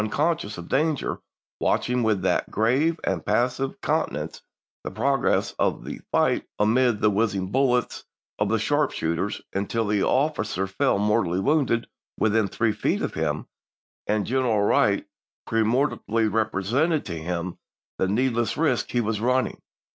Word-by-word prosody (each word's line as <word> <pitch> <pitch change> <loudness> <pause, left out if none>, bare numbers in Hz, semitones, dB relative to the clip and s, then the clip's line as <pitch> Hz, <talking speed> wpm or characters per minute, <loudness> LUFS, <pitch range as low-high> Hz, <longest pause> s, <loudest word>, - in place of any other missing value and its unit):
conscious 150 -5 -1
of 85 -1 -8
danger, 150 0 0 0.4
watching, 125 0 +1
with 110 -4 +1
that - - +1
grave 135 - +1
and - - -1
passive 130 +2 0
countenance, - - -2 0.4
the - - -4
progress - - +1
of - - 0
the - - -7
fight - - +2
amid 115 +1 +3
the 105 - +4
whizzing 100 -3 0
bullets 125 -2 +1 0.4
of 105 -1 +1
the 115 - +2
sharp 145 +6 +1
shooters, 85 +5 -2
until 100 +2 -1
an 105 -2 +2
officer 130 - 0
fell 95 +1 +1
mortally 100 -3 +1
wounded 135 -1 +1 0.3
within 110 -1 +2
three 115 +3 0
feet 105 - -1
of - - -2
him, - - -2 0.6
and 105 -1 +1
General 120 -5 +1
Wright - - +3 0.4
peremptorily 115 0 +1
represented 110 - 0
to 85 - -4
him 85 +1 -4 0.4
the 95 - +2
needless 120 +2 0
risk 145 -6 +1
he 120 - +1
was 110 -1 -2
running. 125 +2 0
115 Hz, 140 wpm, -25 LUFS, 100-130 Hz, 0.6 s, the